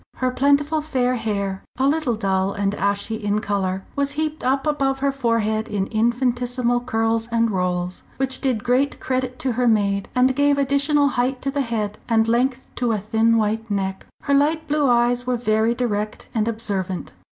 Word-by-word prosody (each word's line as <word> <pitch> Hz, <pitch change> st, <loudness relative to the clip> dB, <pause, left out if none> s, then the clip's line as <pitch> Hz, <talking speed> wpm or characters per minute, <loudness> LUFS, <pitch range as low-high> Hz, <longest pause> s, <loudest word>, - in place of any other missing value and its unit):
Her 255 Hz, 0 st, 0 dB
plentiful 285 Hz, +4 st, +2 dB
fair 255 Hz, -5 st, 0 dB
hair, 200 Hz, -5 st, -2 dB
a 260 Hz, -, +1 dB
little 290 Hz, -5 st, +1 dB
dull 195 Hz, -2 st, 0 dB
and 200 Hz, 0 st, -1 dB
ashy 200 Hz, +2 st, -1 dB
in 205 Hz, 0 st, +1 dB
colour, 195 Hz, -2 st, -2 dB
was 280 Hz, 0 st, 0 dB
heaped 310 Hz, +1 st, -3 dB
up 270 Hz, +2 st, +1 dB
above 275 Hz, -3 st, +1 dB
her 275 Hz, +1 st, +1 dB
forehead 230 Hz, -4 st, 0 dB
in 200 Hz, -2 st, -1 dB
infinitesimal 245 Hz, +2 st, 0 dB
curls 225 Hz, -1 st, 0 dB
and 230 Hz, -1 st, +2 dB
rolls 180 Hz, -1 st, -2 dB, 0.2 s
which 265 Hz, -1 st, -2 dB
did 250 Hz, -6 st, 0 dB
great 260 Hz, +3 st, +1 dB
credit 255 Hz, -1 st, -2 dB
to 260 Hz, -, -1 dB
her 245 Hz, +1 st, +1 dB
maid, 200 Hz, -3 st, +1 dB
and 255 Hz, +1 st, +3 dB
gave 285 Hz, 0 st, +3 dB
additional 280 Hz, +1 st, +2 dB
height 250 Hz, +1 st, 0 dB
to 275 Hz, -, -1 dB
the 285 Hz, 0 st, 0 dB
head 215 Hz, -4 st, -3 dB
and 225 Hz, -1 st, +3 dB
length 250 Hz, +3 st, +1 dB
to 245 Hz, -2 st, +1 dB
a -, -, +1 dB
thin 220 Hz, +3 st, +2 dB
white 220 Hz, +1 st, -1 dB
neck. 195 Hz, -1 st, -2 dB, 0.2 s
Her 280 Hz, -, 0 dB
light 310 Hz, +3 st, +2 dB
blue 295 Hz, -2 st, +2 dB
eyes 245 Hz, +1 st, +2 dB
were 250 Hz, -1 st, +1 dB
very 225 Hz, 0 st, +1 dB
direct 215 Hz, -4 st, -2 dB
and 220 Hz, -1 st, 0 dB
observant. 200 Hz, -5 st, -3 dB
240 Hz, 180 wpm, -22 LUFS, 215-270 Hz, 0.2 s, and